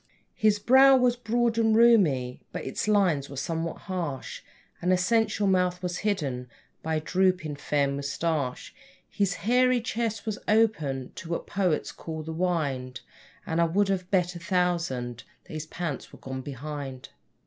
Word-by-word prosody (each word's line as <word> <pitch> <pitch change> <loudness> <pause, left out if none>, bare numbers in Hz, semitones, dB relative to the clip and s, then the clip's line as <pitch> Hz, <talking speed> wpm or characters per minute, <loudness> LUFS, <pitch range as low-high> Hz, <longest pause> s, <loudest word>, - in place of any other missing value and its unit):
His 215 -3 +3
brow 265 +5 +6
was 250 -1 +3
broad 235 -1 0
and 220 -1 +3
roomy, 175 - +4
but - - -5
its 135 - -3
lines 185 -10 +2
were 140 - -8
somewhat 165 +3 -3
harsh, 170 -8 -4 0.4
And 180 - +1
a 185 - +4
sensual 210 +1 +1
mouth 180 -1 +1
was 180 0 -2
hidden 140 - -2 0.3
by 160 0 -1
a - - +1
drooping, 180 -3 0
fair 145 0 +1
moustache; 140 0 -2 0.3
(His 195 -3 0
hairy 250 +2 +4
chest 225 -2 -3
was 215 -2 -3
open 160 - +1
to 165 - -9
what 170 - -2
poets 180 -6 0
call 160 -1 -7
the 160 +1 -5
'wined', 145 -8 -1 0.4
And 165 +1 0
I - - +5
would 195 +4 +1
have 185 -2 -1
bet 180 -2 +1
a - - -6
thousand 170 - -1 0.2
that - - -13
his 155 0 -5
pants 165 -4 -5
were - - -13
gone 130 0 -6
behind). 140 -1 -7
175 Hz, 160 wpm, -27 LUFS, 145-210 Hz, 0.4 s, brow